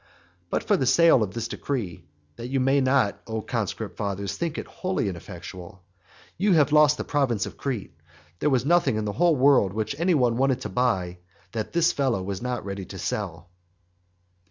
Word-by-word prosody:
But - - -2
by 205 - +4
the 130 - 0
sale 165 -3 +5
of 100 -2 -2
this 115 -1 -2
decree 95 - -4 0.3
(that 120 - -7
you 135 +1 0
may 135 +2 +3
not, 130 -5 +2
O 110 0 -3
conscript - - -3
fathers, 100 -1 -3
think 170 -2 -3
it - - -4
wholly 185 - -2
ineffectual) 90 +1 -9 0.6
you 200 0 +3
have 150 -3 +4
lost 150 -1 +5
the - - -3
province 130 -8 0
of - - -8
Crete. 120 -11 -4 0.5
There - - +2
was 130 -3 +1
nothing 170 -6 +3
in 110 0 -2
the 105 - -2
whole 170 +3 +3
world 130 -8 +4
which 110 +3 -2
any 175 0 +3
one 120 -4 +2
wanted 130 -1 +1
to - - -4
buy 95 -8 0 0.3
that 110 -2 -4
this 170 0 +3
fellow 130 -9 0
was 95 0 -4
not 125 -2 -3
ready 100 -1 -5
to - - -9
sell. 85 +3 -4
125 Hz, 190 wpm, -25 LUFS, 100-145 Hz, 0.6 s, sale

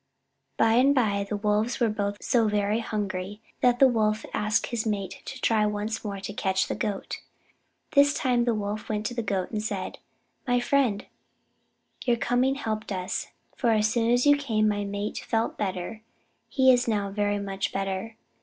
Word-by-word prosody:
By 225 0 +4
and 275 +3 +5
by 200 -5 +1
the 210 - -1
Wolves 210 +3 0
were 235 - +3
both 205 -1 -2
so 230 -3 +3
very 210 +1 +1
hungry 205 -3 -3 0.2
that 245 -1 +4
the 270 - +7
Wolf 215 -3 +1
asked 215 0 +1
his 235 -2 -1
mate 200 -4 -3
to 265 - -7
try 220 -3 +2
once 210 +1 -3
more 200 -2 -4
to 200 - -5
catch 190 -2 +1
the - - -2
Goat. 200 -2 -3 0.7
This 285 -1 +5
time 245 -3 +1
the 235 -2 +2
Wolf 210 0 -4
went 210 -1 -2
to 245 - -2
the 240 - -2
Goat 195 -4 -2
and 215 -2 -2
said: 200 -3 -4 0.5
"My 245 0 +3
friend, 245 -5 +1 1.0
your 240 -2 +2
coming 245 +3 +1
helped 220 -6 -4
us, 185 -1 -3 0.3
for 240 - +1
as 215 -1 +3
soon 230 -1 +1
as 245 +2 +3
you 290 0 +7
came, 220 -7 +1
my 205 -1 0
mate 200 +1 -3
felt 225 0 -1
better. 195 +1 -4 0.5
He 260 -1 +5
is 245 0 +1
now 205 -3 0
very 205 0 0
much 195 -1 -3
better. 195 +3 -3
215 Hz, 180 wpm, -27 LUFS, 205-240 Hz, 1.0 s, the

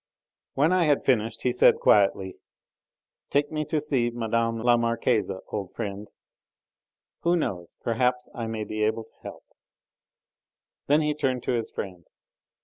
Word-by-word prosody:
When 155 +6 +3
I 180 -2 +3
had 145 -2 +2
finished 115 -3 +1
he 125 - +2
said 125 - +5
quietly: 95 -2 +3 0.9
"Take 145 +1 +1
me 155 -1 -1
to 155 +1 0
see 135 -5 0
Mme. 115 -1 -1
la 120 0 +5
Marquise, 115 -1 +1 0.2
old 100 -4 -5
friend. 100 +1 -5 1.1
Who 170 +1 +2
knows? 90 - -3
perhaps 125 +2 0
I 115 -2 -4
may 110 -1 -3
be 110 0 -4
able 110 +1 0
to 110 - -25
help." - - -10 1.4
Then 150 +2 +4
he 150 0 +1
turned 130 -4 -1
to - - -1
his 115 -2 -1
friend. 90 -4 -7
120 Hz, 145 wpm, -26 LUFS, 110-140 Hz, 1.4 s, said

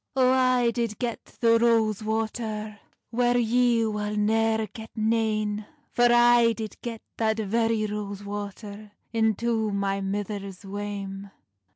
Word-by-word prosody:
"O 255 -1 +4
I 255 -2 +3
did 230 -3 -2
get 240 -2 -3
the 230 -1 +2
rose 225 -3 +2
water 220 -1 -3 0.3
Whair 245 +1 +2
ye 240 0 +3
wull 210 -1 -2
neir 220 +1 +2
get 220 -1 -9
nane, 215 -2 0 0.2
For 240 0 +4
I 240 -1 +5
did 220 -2 -6
get 230 -2 -6
that 220 -1 +1
very 225 +1 +1
rose 205 -1 -5
water 205 +1 -7 0.2
Into 220 0 +1
my 200 0 -1
mither's 200 -1 -4
wame." 200 0 -5
220 Hz, 130 wpm, -26 LUFS, 205-230 Hz, 0.3 s, I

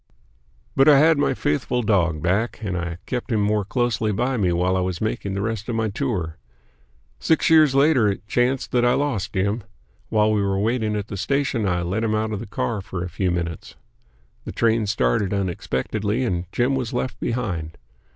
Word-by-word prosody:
But 135 +2 +6
I 145 - +8
had 155 +1 +5
my - - +1
faithful 120 +11 -1
dog 85 -7 +1
back, 100 +7 0
and 95 -3 -2
I 85 -1 -3
kept 125 0 -4
him 110 - +2
more 105 0 +1
closely 110 0 0
by 125 +6 0
me 95 -7 +1
while 90 +2 +1
I - - +1
was 90 -1 -2
making 100 -2 -2
the 100 - -2
rest 110 0 -3
of 120 - -1
my 110 -1 0
tour. 95 - -3 0.8
Six 160 - +2
years 155 -4 +6
later 140 -5 +4
it 100 +1 -2
chanced 125 +3 0
that 120 -1 +2
I 120 0 +4
lost 140 -9 -1
Jim. 100 +4 0 0.5
While 110 0 +3
we 105 -1 +2
were 100 -1 0
waiting 110 +1 0
at 105 +1 -4
a 100 - -4
station, 135 -1 0
I 90 -1 0
let 95 +6 -1
him 110 -1 +1
out 110 0 -1
of 105 - -3
the - - -7
car 65 +11 -2
for 95 -1 -5
a 90 - -5
few 90 +2 -1
minutes. 85 -1 -4 0.7
The - - -6
train 115 -2 +1
started 100 - +1
unexpectedly 100 - -2
and 90 -6 -2
Jim 125 +3 +1
was 130 -3 -2
left 125 +1 -3
behind. 90 -10 -3
105 Hz, 200 wpm, -23 LUFS, 95-120 Hz, 0.8 s, I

